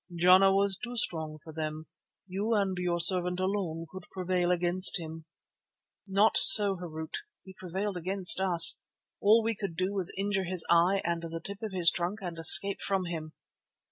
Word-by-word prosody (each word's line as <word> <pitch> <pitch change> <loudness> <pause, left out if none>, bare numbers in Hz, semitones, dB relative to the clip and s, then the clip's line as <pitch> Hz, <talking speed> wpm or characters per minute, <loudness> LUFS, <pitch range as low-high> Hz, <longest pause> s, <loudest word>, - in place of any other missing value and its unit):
Jana 185 +3 +3
was 195 -1 -2
too 245 0 -8
strong 160 -9 -5
for 160 +1 -15
them; 155 0 -7 0.4
you 200 +4 -4
and 195 -2 -2
your 175 -1 -4
servant 180 +1 +3
alone 185 -4 -5
could 185 -1 -12
prevail 180 -1 -4
against 180 +1 +1
him." 160 -1 -11 0.8
"Not 200 +3 +1
so, 205 -9 +7
Harût. 160 -3 -10 0.3
He 190 - -15
prevailed 190 +2 -7
against 185 +2 +2
us; 170 -3 +5 0.4
all 220 +3 +2
we 225 +1 -3
could 200 -5 -8
do 185 +3 -4
was 190 -4 -1
to - - -5
injure 195 -1 -3
his 180 -1 -2
eye 175 +3 +1
and 170 0 -4
the 165 0 -9
tip 200 +4 -10
of 220 -2 -7
his 175 -2 +2
trunk 180 +4 -5
and 175 -4 -9
escape 195 +4 +5
from 195 -2 -3
him." 160 -2 -9
185 Hz, 175 wpm, -26 LUFS, 170-195 Hz, 0.8 s, so